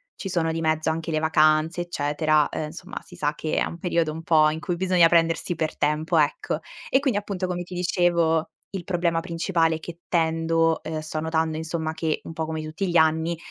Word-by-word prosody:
ci - - -6
sono 170 -3 0
di 165 - -2
mezzo 155 0 +1
anche 165 +1 -2
le 155 - +1
vacanze 155 +2 +3
eccetera, 155 -2 +1
ehm, 155 - -3
insomma 175 +5 -8
si 180 - -14
sa 150 -3 -1
che 155 0 -2
è - - +3
un 170 - -6
periodo 170 -2 0
un 160 +1 -7
po' 155 -2 +5
in 155 +1 -3
cui 175 +1 -2
bisogna 180 -1 +4
prendersi 165 +1 +2
per 160 -1 -2
tempo, 155 +3 +1
ecco. 150 0 +1 0.3
E 265 - +4
quindi 265 -7 +1
appunto, 200 -2 -4
come 180 -1 -3
ti 180 +1 -9
dicevo, 170 -2 +2 0.2
il 190 -3 -5
problema 170 -2 0
principale 165 -1 0
è - - -6
che 170 +1 -9
tendo, 165 -1 +1
ehm 160 0 -4
sto 155 0 -4
notando 160 0 0
insomma 160 0 -3
che 160 -1 -2
un - - -8
po' 160 0 -2
come 160 0 -4
tutti 160 +5 -3
gli 170 - +3
anni, 160 +1 +2
165 Hz, 215 wpm, -24 LUFS, 155-175 Hz, 0.3 s, po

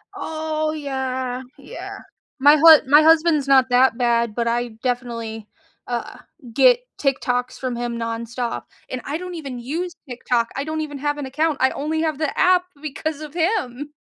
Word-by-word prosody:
Oh 310 -1 -2
yeah, 260 -4 -3 0.2
yeah, - - -9 0.4
my 290 +3 +7
hu 320 0 +9
my 295 +2 +8
husband's 320 -3 +4
not 265 -2 +6
that 250 -1 +4
bad 235 -2 +1
but 235 -1 -1
I 240 +1 0
definitely, 230 -3 -3 0.4
uh, 240 -1 -4 0.4
get - - +5 0.2
TikToks 250 -2 0
from 255 -2 -3
him 240 0 -3
nonstop 230 +1 -4 0.3
and 255 - -4
I 295 +3 -2
don't 360 0 -7
even 275 -6 -6
use 330 +8 -4 0.2
TikTok, 240 -1 -1
I 275 - -2
don't 315 +1 -3
even 290 -2 -5
have 290 +1 -1
an 285 - -4
account, 300 +3 0
I 265 - +4
only 315 +2 -2
have 310 -3 -1
the 310 -2 -2
app 365 -1 +4 0.2
because 310 +1 -4
of 300 0 -8
him. 310 - -1
275 Hz, 165 wpm, -21 LUFS, 245-310 Hz, 0.4 s, hu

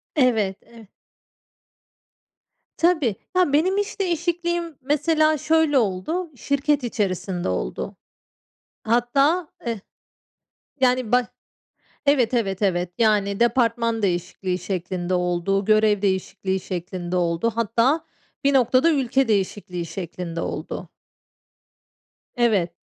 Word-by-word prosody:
Evet, 220 -9 +2
ev 230 -1 -15 1.9
Tabii. 315 - +2 0.2
Ya, 355 -6 +3
benim 370 +6 +3
iş 410 0 -2
değişikliğim, 345 -2 -1
mesela, 310 +3 +2
şöyle 310 0 +2
oldu, 240 - -1
şirket 280 +2 0
içerisinde 190 - -2
oldu. - - -3 0.9
Hatta 275 +9 +2 0.2
eh 230 -3 -2 1.0
yani, 255 -3 +2
bah 250 0 +4 0.8
evet, 260 -5 +3
evet, 195 -5 0
evet, 180 -3 0
yani, 205 -3 +2
departman 230 -1 +2
değişikliği 180 0 -1
şeklinde 180 0 -3
oldu, 180 +2 0
görev 215 -1 +3
değişikliği 190 -1 -1
şeklinde 180 0 -5
oldu. 175 +5 +1
Hatta 230 +8 +1 0.4
bir 280 0 +3
noktada 260 +4 +4
ülke 270 -2 +1
değişikliği 190 -4 -1
şeklinde 170 0 -5
oldu. - - -5 1.5
Evet. 210 -8 +2
230 Hz, 95 wpm, -23 LUFS, 190-280 Hz, 1.9 s, bah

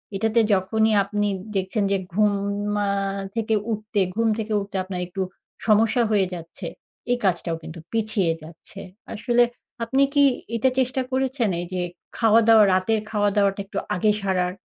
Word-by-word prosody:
এটাতে 225 +3 +2
যখনই 220 +3 +2
আপনি 205 +1 -1 0.3
দেখছেন 195 +3 0
যে 200 - +3 0.2
ঘুম 210 +1 +3 0.5
আ - - +1 0.5
থেকে 220 -1 0 0.2
উঠতে, 215 -1 -2 0.2
ঘুম 230 0 +2
থেকে 220 0 -3
উঠতে 200 0 -7
আপনার 185 -1 -5
একটু 190 +2 -5 0.5
সমস্যা 225 +3 +4
হয়ে 200 -3 +3
যাচ্ছে, 165 -1 -7 0.4
এই 245 - +3
কাজটাও 170 -3 0
কিন্তু 160 +1 -8
পিছিয়ে 215 -6 +1
যাচ্ছে। 165 +4 -12 0.3
আসলে 240 +2 +3 0.4
আপনি 265 +4 +2
কি 285 -1 +5 0.3
এটা 245 +3 +3
চেষ্টা 260 +1 +1
করেছেন 260 -4 0
এই 175 - -3
যে 180 - -1 0.4
খাওয়া-দাওয়া, 225 0 +6
রাতের 200 +4 +2
খাওয়া-দাওয়াটা 205 -2 +1
একটু 195 0 -8 0.2
আগে 210 +4 +3
সারার? 180 -2 0
210 Hz, 145 wpm, -23 LUFS, 190-225 Hz, 0.5 s, খাওয়া-দাওয়া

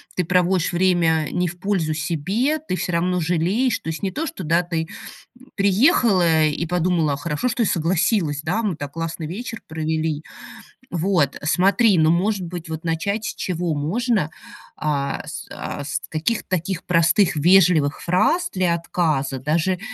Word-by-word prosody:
ты 180 - 0
проводишь 180 +1 +1
время 170 -3 +2
не 180 0 0
в 175 +1 -7
пользу 180 -5 0
себе, 185 - -1
ты 305 -11 -4
всё 180 - -3
равно 180 +2 +1
жалеешь, 180 +10 +1
то - - -6
есть 160 +3 -5
не 195 - 0
то, 315 - -3
что, 310 - -6
да, 165 +3 +2
ты 165 -2 -3 0.7
приехала 195 - +4
и 150 +2 -2
подумала: 170 -3 +1
"Хорошо, 150 - -2
что 235 0 0
согласилась, 170 -3 +1
да, 180 +8 0
мы 200 -6 -1
так 145 -2 -6
классно 165 0 -4
вечер 225 +7 -6
провели". 160 -1 -2 0.7
Вот 170 -5 +1
смотри, 195 +6 +3
ну, 160 0 +4
может 190 +3 +1
быть, 170 -1 -7
вот 160 0 -5
начать 200 +7 -1
с - - -3
чего 175 -2 -2
можно, 190 - 0 0.5
а 140 -2 -2
с 160 +2 -7
а 145 - -5
с 140 0 -3
каких-то 165 +9 -2
таких 185 0 -2
простых 170 +2 +3
вежливых 165 -3 +4
фраз 320 - +2
для 180 -3 +1
отказа, 155 -6 -1
даже 165 +7 0
170 Hz, 155 wpm, -22 LUFS, 160-190 Hz, 0.7 s, приехала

